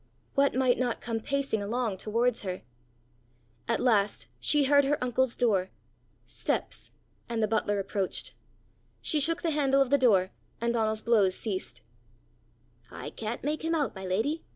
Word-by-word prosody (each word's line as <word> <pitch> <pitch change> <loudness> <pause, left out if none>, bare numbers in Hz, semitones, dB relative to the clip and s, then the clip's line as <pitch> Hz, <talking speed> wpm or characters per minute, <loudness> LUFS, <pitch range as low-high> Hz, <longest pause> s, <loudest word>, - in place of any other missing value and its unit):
What 280 -1 +3
might 255 -1 +2
not 245 -2 0
come 230 -1 -3
pacing 275 -3 -1
along 220 -1 -1
towards 230 +4 0
her! 185 - -5 1.0
At 230 - +1
last 205 - +2
she 290 - +3
heard 285 +1 +5
her 285 +2 +1
uncle's 250 0 0
door 200 -7 +1 0.6
steps - - -3 0.4
and 230 -2 -1
the - - +3
butler 205 -1 0
approached. 195 -1 -3 0.7
She 305 - +1
shook 330 +4 +2
the 330 - +1
handle 275 -2 +2
of 270 -1 +2
the 285 - +5
door, 195 -7 +4 0.3
and 235 0 0
Donal's 220 -1 0
blows 205 -5 +3
ceased. 200 -4 -4 1.1
"I - - -7
can't 225 +2 -5
make 300 +2 -2
him 330 +1 +1
out, 295 -4 0
my 190 - -8
lady!" 220 - -1
235 Hz, 155 wpm, -29 LUFS, 205-275 Hz, 1.1 s, heard